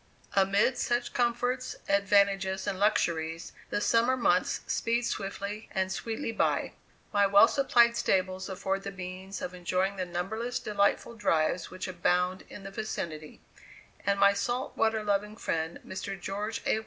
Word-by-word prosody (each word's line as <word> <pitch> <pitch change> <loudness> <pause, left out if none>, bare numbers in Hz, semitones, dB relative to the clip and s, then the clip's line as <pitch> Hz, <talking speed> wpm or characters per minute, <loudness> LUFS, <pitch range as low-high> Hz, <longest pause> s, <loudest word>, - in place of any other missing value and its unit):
Amid 200 +6 +3
such 240 0 0
comforts, 245 +1 0
advantages, 195 -1 +2
and 200 -2 -2
luxuries 165 -5 0 0.2
the - - 0
summer 235 +4 +3
months 180 -7 +2
speed 235 +1 0
swiftly 200 0 -4
and 190 0 0
sweetly 225 +2 -3
by. 225 - 0 0.4
My 200 -1 +4
well 200 +1 +7
supplied 235 -4 +4
stables 185 -3 0
afford 195 +1 -2
the 195 - -5
means 190 0 -7
of 180 - -4
enjoying 185 +2 -1
the 185 - -1
numberless 220 +8 -3
delightful 200 +2 0
drives 180 -6 +1
which 185 +1 -6
abound 180 +1 0
in 200 - -10
the 195 - -7
vicinity; 160 -8 -5 0.6
and 200 0 +1
my 200 0 +6
salt 240 +6 -2
water 220 -1 +1
loving 210 +1 -1
friend, 160 -5 -2
Mr. 190 0 -5
George 205 +4 -4
A. 220 - +2
200 Hz, 145 wpm, -29 LUFS, 185-220 Hz, 0.6 s, well